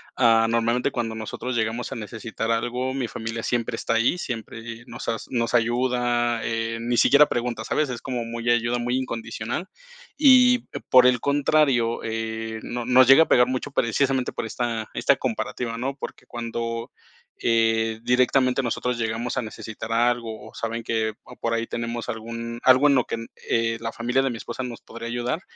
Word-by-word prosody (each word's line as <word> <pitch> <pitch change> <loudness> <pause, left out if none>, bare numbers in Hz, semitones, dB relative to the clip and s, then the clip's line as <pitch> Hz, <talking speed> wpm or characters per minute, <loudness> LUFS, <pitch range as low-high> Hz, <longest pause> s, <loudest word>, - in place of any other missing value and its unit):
Ah, 115 -2 +4
normalmente, 115 +1 +1
cuando 115 -2 -3
nosotros 110 +3 -5
llegamos 115 +2 -2
a - - -4
necesitar 115 +1 -5
algo, 120 +3 -1
mi 130 -4 -2
familia 115 0 -5
siempre 120 -1 -1
está 115 - -1
ahí. 115 +9 +2
Siempre 115 - -6
nos 120 0 -6
as 115 - -3
nos 120 -1 -1
ayuda, 120 0 +1
eh, 115 0 -2
ni 120 +1 -1
siquiera 145 +4 +6
pregunta, 120 -2 -2
¿sabes? 150 -2 0
Es 120 -2 -5
como 125 -2 -3
muy 115 +1 -4
ayuda 120 0 +2
muy 120 +1 -1
incondicional. 120 - -4 0.5
Y, 255 -3 +7 0.3
por 125 -1 +7
el 125 -1 +3
contrario, 140 -4 +2
eh, 110 0 -4
nos 120 0 -4
nos 130 +1 +7
llega 135 +5 +8
a - - -7
pegar 125 0 +5
mucho 130 +2 -3
precisamente 130 +2 +1
por - - -4
esta 115 -1 -3
esta - - +2
comparativa, 115 -2 -3
¿no? 135 +3 -3
Porque - - -8
cuando, 115 0 -4 0.5
eh, 115 -1 +2
directamente 130 +1 +3
nosotros 125 0 -1
llegamos 115 +2 -2
a - - +2
necesitar 110 0 -7
algo 115 -2 0
o - - -18
saben 115 0 -4
que, 110 -1 -1
o - - -13
por 115 - -2
ahí 115 0 -1
tenemos 115 0 -4
algún 115 +1 -5
algo 130 +3 +6
en 140 - +5
lo 125 - +2
que - - -3
en 115 0 -7 0.2
eh, 115 0 +1
la 115 - -3
familia 125 +3 0
de 135 - 0
mi 120 - -4
esposa 120 +3 -6
nos 120 -2 -7
podría 115 0 -8
ayudar, 120 +6 -2
120 Hz, 180 wpm, -24 LUFS, 115-125 Hz, 0.5 s, llega